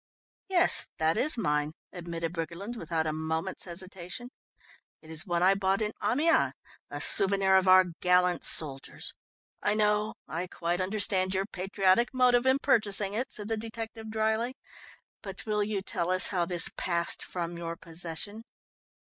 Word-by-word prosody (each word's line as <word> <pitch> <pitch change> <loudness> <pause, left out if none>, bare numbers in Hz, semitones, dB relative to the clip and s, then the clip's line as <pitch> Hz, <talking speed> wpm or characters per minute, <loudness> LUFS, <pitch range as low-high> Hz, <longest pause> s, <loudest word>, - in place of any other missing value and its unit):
"Yes, 370 -1 +6
that 160 +1 +1
is 300 0 +2
mine," 150 -6 -1 0.2
admitted 170 -1 -5
Briggerland 175 +7 -5
without 165 -5 -2
a 155 - -1
moment's 160 +4 -4
hesitation. 185 +6 -7 0.7
"It 160 - -14
is 160 +5 -2
one 175 0 0
I 190 +1 +5
bought 195 0 0
in 210 -1 -1
Amiens, 295 +10 +2 0.4
a - - -6
souvenir 195 -1 +6
of 190 0 +3
our 185 0 +7 0.2
gallant 180 -1 +2
soldiers 135 -4 -1 0.3
" - - -56
"I 205 - +1
know, 210 0 +1
I 170 +4 -4
quite 175 +1 -3
understand 190 -1 +1
your 190 +1 0
patriotic 195 +5 0
motive 250 0 +3
in 260 +1 +4
purchasing 205 -6 0
it," 255 +5 -3
said 210 -2 -7
the 225 0 -2
detective 225 0 -7
dryly, 220 +3 -1 0.7
"but 195 -1 -9
will 210 -1 0
you 205 -2 -3
tell 175 -3 -3
us 185 0 +4
how 180 -3 0
this 175 -1 +1
passed 170 -1 -1
from 175 -1 -5
your 170 0 -5
possession." 170 +6 -6
190 Hz, 160 wpm, -28 LUFS, 170-215 Hz, 0.7 s, our